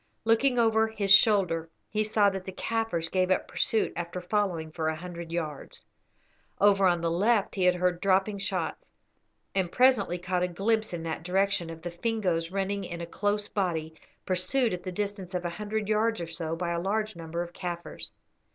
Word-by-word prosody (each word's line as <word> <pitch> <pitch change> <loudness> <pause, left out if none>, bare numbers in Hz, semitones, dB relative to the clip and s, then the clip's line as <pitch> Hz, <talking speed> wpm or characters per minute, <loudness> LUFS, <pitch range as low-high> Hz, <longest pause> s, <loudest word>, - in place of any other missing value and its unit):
Looking 245 +3 +3
over 225 -1 +4
his 205 -3 -2
shoulder 185 -6 +4 0.2
he 215 0 0
saw 210 -1 +3
that 190 -1 -5
the 190 - -6
Kaffirs 225 -4 -1
gave 185 +1 +1
up 185 - +1
pursuit 220 - 0
after 175 +1 -4
following 180 -4 -1
for 160 0 -2
a 160 - 0
hundred 170 0 -8
yards. 155 -4 -5 0.7
Over 195 -1 +5
on 175 -2 +2
the 165 0 0
left 205 +4 +2
he 185 -2 +2
heard 180 -1 +2
dropping 195 +1 +2
shots, 200 - -3 0.7
and 185 -3 0
presently 250 -8 +3
caught 180 0 -1
a 180 - +2
glimpse 215 +5 0
in 170 -2 -4
that 160 -1 -3
direction 185 0 +1
of 165 0 -9
the 175 - -4
Fingoes 175 -4 -1
running 195 +1 -2
in 170 -2 -6
a 170 - -4
close 205 +4 -1
body, 165 -5 -2 0.3
pursued 190 +6 +1
at 180 - -4
the 185 - -5
distance 200 -1 -4
of 180 -1 -2
a 175 - -1
hundred 210 +3 -3
yards 220 +1 +1
or 170 - -3
so 165 0 -4
by 170 0 -2
a 170 0 -1
large 215 +3 -1
number 170 +1 -4
of 175 0 -10
Kaffirs. 175 -2 -6
185 Hz, 190 wpm, -28 LUFS, 170-210 Hz, 0.7 s, Over